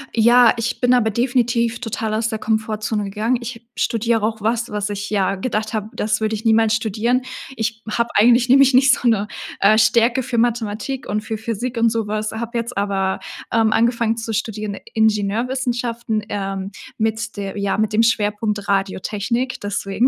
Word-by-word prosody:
ja, 235 Hz, +1 st, +6 dB
ich 230 Hz, 0 st, -2 dB
bin 245 Hz, 0 st, +4 dB
aber 235 Hz, -3 st, +3 dB
definitiv 235 Hz, 0 st, 0 dB
total 225 Hz, -1 st, -3 dB
aus 220 Hz, +1 st, 0 dB
der 220 Hz, -, -4 dB
Komfortzone 215 Hz, -1 st, -1 dB
gegangen. 215 Hz, +5 st, 0 dB
Ich 235 Hz, -1 st, -8 dB
studiere 230 Hz, -1 st, 0 dB
auch 220 Hz, 0 st, -1 dB
was, 230 Hz, +2 st, 0 dB
was 210 Hz, -1 st, -2 dB
ich, 205 Hz, 0 st, -4 dB
ja, 195 Hz, -2 st, +1 dB
gedacht 215 Hz, +2 st, -3 dB
hab, 215 Hz, +1 st, -4 dB
das 215 Hz, +1 st, -1 dB
würde 220 Hz, 0 st, 0 dB
ich 215 Hz, +2 st, -8 dB
niemals 225 Hz, -1 st, +4 dB
studieren. 225 Hz, +3 st, 0 dB, 0.4 s
Ich 220 Hz, 0 st, -3 dB
hab 235 Hz, +2 st, 0 dB
eigentlich 240 Hz, +3 st, +5 dB
nämlich 275 Hz, 0 st, +6 dB
nicht 260 Hz, 0 st, +6 dB
so 250 Hz, -, 0 dB
'ne, 210 Hz, -3 st, +2 dB, 0.3 s
äh, 215 Hz, +2 st, +5 dB
Stärke 235 Hz, +3 st, +3 dB
für 240 Hz, -1 st, -3 dB
Mathematik 235 Hz, +2 st, -1 dB
und 210 Hz, +1 st, -1 dB
für 220 Hz, 0 st, -4 dB
Physik 230 Hz, +3 st, -4 dB
und 230 Hz, 0 st, +4 dB
sowas, 215 Hz, -1 st, -2 dB
habe 235 Hz, +2 st, -4 dB
jetzt 235 Hz, 0 st, -4 dB
aber, 195 Hz, -1 st, 0 dB, 0.3 s
ähm, 220 Hz, -1 st, +3 dB
angefangen 230 Hz, 0 st, +2 dB
zu 225 Hz, -1 st, -4 dB
studieren, 215 Hz, -1 st, -3 dB, 0.2 s
Ingenieurwissenschaften, 230 Hz, +1 st, 0 dB
ähm, 195 Hz, -1 st, -3 dB, 0.3 s
mit 220 Hz, +1 st, -2 dB
der 195 Hz, 0 st, -5 dB
ja, 200 Hz, -1 st, -1 dB
mit 215 Hz, 0 st, 0 dB
dem 225 Hz, -, +4 dB
Schwerpunkt 210 Hz, -2 st, 0 dB
Radiotechnik, 205 Hz, +6 st, -1 dB
deswegen 205 Hz, +3 st, 0 dB
220 Hz, 170 wpm, -20 LUFS, 210-235 Hz, 0.4 s, ja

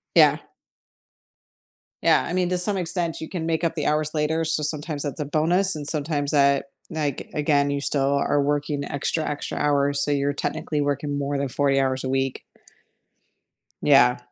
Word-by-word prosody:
Yeah. -, -, +6 dB, 1.7 s
Yeah, -, -, +4 dB
I 175 Hz, -, -4 dB
mean, 180 Hz, -1 st, +1 dB
to 180 Hz, -, 0 dB
some 195 Hz, +2 st, 0 dB
extent 175 Hz, -1 st, -2 dB
you 160 Hz, -, -6 dB
can 170 Hz, -4 st, -4 dB
make 165 Hz, 0 st, -1 dB
up 165 Hz, 0 st, 0 dB
the 150 Hz, -, -1 dB
hours 155 Hz, 0 st, +1 dB
later, 160 Hz, +1 st, 0 dB
so 160 Hz, 0 st, +1 dB
sometimes 150 Hz, 0 st, -2 dB
that's 145 Hz, +2 st, -5 dB
a 150 Hz, -, -2 dB
bonus, 170 Hz, +5 st, +2 dB
and 145 Hz, -1 st, -5 dB
sometimes 145 Hz, -2 st, -1 dB
that 140 Hz, -1 st, +3 dB, 0.2 s
like, 150 Hz, -4 st, -3 dB
again, 145 Hz, -1 st, +2 dB
you 140 Hz, 0 st, -1 dB
still 140 Hz, -1 st, +1 dB
are 140 Hz, +1 st, +1 dB
working 145 Hz, 0 st, -1 dB
extra, 150 Hz, +3 st, -1 dB
extra 145 Hz, -, -4 dB
hours, 140 Hz, -1 st, +2 dB
so, 145 Hz, -, 0 dB
you're 140 Hz, 0 st, +1 dB
technically 150 Hz, +1 st, -3 dB
working 145 Hz, 0 st, -1 dB
more 140 Hz, 0 st, -2 dB
than 140 Hz, 0 st, -1 dB
40 135 Hz, +1 st, +1 dB
hours 130 Hz, -1 st, 0 dB
a 130 Hz, -, -2 dB
week. 135 Hz, 0 st, -1 dB, 1.4 s
Yeah. 125 Hz, -4 st, +5 dB
145 Hz, 175 wpm, -24 LUFS, 140-160 Hz, 1.7 s, Yeah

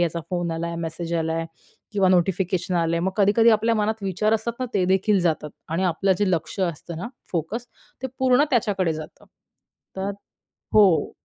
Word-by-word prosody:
याचा 170 Hz, -1 st, 0 dB
फोन 175 Hz, -1 st, -1 dB
आला, 170 Hz, +1 st, -3 dB
मेसेज 165 Hz, +1 st, -4 dB
आलाय." 165 Hz, 0 st, -1 dB, 0.5 s
किंवा 195 Hz, -2 st, +3 dB
नोटिफिकेशन 185 Hz, 0 st, +1 dB
आलंय. 170 Hz, 0 st, +1 dB
मग 190 Hz, +2 st, -1 dB
कधी-कधी 215 Hz, +3 st, +5 dB
आपल्या 225 Hz, +1 st, +3 dB
मनात 215 Hz, 0 st, -1 dB
विचार 200 Hz, +3 st, +1 dB
असतात 225 Hz, +2 st, -1 dB
ना, 255 Hz, -, 0 dB
ते 190 Hz, -, +2 dB
देखील 190 Hz, +2 st, +2 dB
जातात. 160 Hz, -3 st, 0 dB, 0.2 s
आणि 165 Hz, +4 st, -1 dB
आपलं 185 Hz, +2 st, +2 dB
जे 205 Hz, -2 st, +2 dB
लक्ष 175 Hz, +3 st, -2 dB
असतं, 170 Hz, -1 st, -3 dB
ना 185 Hz, +8 st, -5 dB, 0.2 s
फोकस, 190 Hz, +9 st, -3 dB, 0.4 s
ते -, -, 0 dB
पूर्ण 260 Hz, +2 st, +4 dB
त्याच्याकडे 205 Hz, -, +1 dB
जातं. 155 Hz, +2 st, -9 dB, 0.7 s
तर 195 Hz, +1 st, -2 dB, 0.6 s
हो. 195 Hz, -6 st, +5 dB
185 Hz, 165 wpm, -24 LUFS, 170-210 Hz, 0.7 s, कधी-कधी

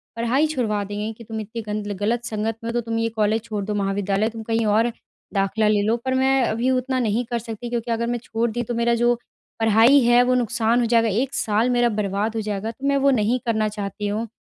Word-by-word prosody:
पढ़ाई 240 Hz, +6 st, +1 dB
छुड़वा 225 Hz, -9 st, -1 dB
देंगे 205 Hz, +2 st, -4 dB
कि, 230 Hz, -, -13 dB
"तुम 220 Hz, 0 st, -6 dB
इतनी 220 Hz, +2 st, -6 dB
गंद 210 Hz, -1 st, -4 dB
ल 205 Hz, -, -2 dB
गलत 230 Hz, +3 st, 0 dB
संगत 220 Hz, 0 st, -2 dB
में 230 Hz, -, -3 dB
हो -, -, -3 dB
तो 240 Hz, -, 0 dB
तुम 225 Hz, 0 st, -3 dB
ये 230 Hz, 0 st, 0 dB
कॉलेज 220 Hz, 0 st, 0 dB
छोड़ 210 Hz, -3 st, -4 dB
दो, 210 Hz, -, -2 dB
महाविद्यालय 200 Hz, +1 st, 0 dB
तुम 225 Hz, -1 st, -8 dB
कहीं 225 Hz, 0 st, 0 dB
और 220 Hz, +3 st, +2 dB, 0.4 s
दाखिला 200 Hz, +2 st, +1 dB
ले 210 Hz, -1 st, +3 dB
लो।" 220 Hz, +3 st, +2 dB
पर 260 Hz, -, 0 dB
मैं 265 Hz, 0 st, +3 dB
अभी 230 Hz, +3 st, 0 dB
उतना 255 Hz, 0 st, 0 dB
नहीं 230 Hz, +1 st, 0 dB
कर 235 Hz, -, 0 dB
सकती 230 Hz, +1 st, -7 dB
क्योंकि 235 Hz, 0 st, -2 dB
अगर 230 Hz, 0 st, 0 dB
मैं 240 Hz, 0 st, -1 dB
छोड़ 230 Hz, +1 st, -1 dB
दी, 240 Hz, +2 st, -2 dB
तो 240 Hz, +1 st, -4 dB
मेरा 235 Hz, 0 st, +1 dB
जो 240 Hz, +1 st, +3 dB, 0.5 s
पढ़ाई 225 Hz, +5 st, +6 dB
है 240 Hz, +1 st, +5 dB
वो 255 Hz, -, +2 dB
नुकसान 235 Hz, 0 st, +1 dB
हो 240 Hz, -, +2 dB
जाएगा, 230 Hz, -1 st, +3 dB
1 250 Hz, +7 st, -1 dB
साल 220 Hz, -1 st, +1 dB
मेरा 240 Hz, -1 st, +3 dB
बर्बाद 210 Hz, +1 st, -1 dB
हो 220 Hz, -, -1 dB
जाएगा, 210 Hz, +1 st, -3 dB
तो 270 Hz, +4 st, -5 dB
मैं 280 Hz, 0 st, +3 dB
वो 275 Hz, 0 st, +3 dB
नहीं 235 Hz, +5 st, +1 dB
करना 220 Hz, -2 st, +1 dB
चाहती 205 Hz, 0 st, -4 dB
हूँ। 215 Hz, +3 st, -2 dB
225 Hz, 245 wpm, -22 LUFS, 210-240 Hz, 0.5 s, पढ़ाई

